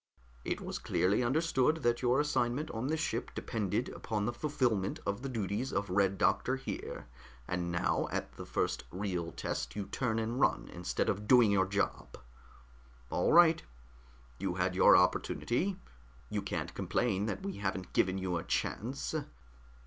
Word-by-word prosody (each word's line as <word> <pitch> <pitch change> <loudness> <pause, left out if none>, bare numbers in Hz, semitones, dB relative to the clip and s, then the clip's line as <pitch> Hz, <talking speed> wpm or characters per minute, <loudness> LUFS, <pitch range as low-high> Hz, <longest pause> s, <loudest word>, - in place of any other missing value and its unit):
"It - - -2
was - - -4
clearly 100 +6 +1
understood 150 +2 +2
that 120 0 +2
your 125 +1 +3
assignment 145 0 0
on 115 +3 -3
this 160 +2 0
ship 120 -7 -2
depended 105 -5 -1
upon 105 -2 -3
the 120 - -1
fulfillment 120 -8 0
of 100 +3 -2
the 135 - -4
duties 110 +1 -2
of 100 -1 -2
Red 95 0 +2
Doctor 130 - +2
here, 135 - -6 0.4
and 90 -1 -2
now 85 - +1
at - - -3
the - - -9
first - - -1
real 90 -3 -3
test - - -4
you 105 -1 -3
turn 115 -1 -1
and 115 +3 -1
run - - +2
instead 90 0 -1
of 105 +1 -1
doing 120 -4 +6
your 95 -1 +3
job. 100 +1 -2 0.9
All 90 - +2
right. 165 -1 +7 0.8
You - - -2
had - - 0
your - - +7
opportunity. 185 +11 +1 0.5
You - - -1
can't - - -3
complain 105 -4 0
that 115 - -3
we 195 - -4
haven't 95 -2 -3
given 95 +1 +2
you 95 -2 -1
a 85 - -4
chance. 130 +9 -2
110 Hz, 160 wpm, -32 LUFS, 95-130 Hz, 0.9 s, right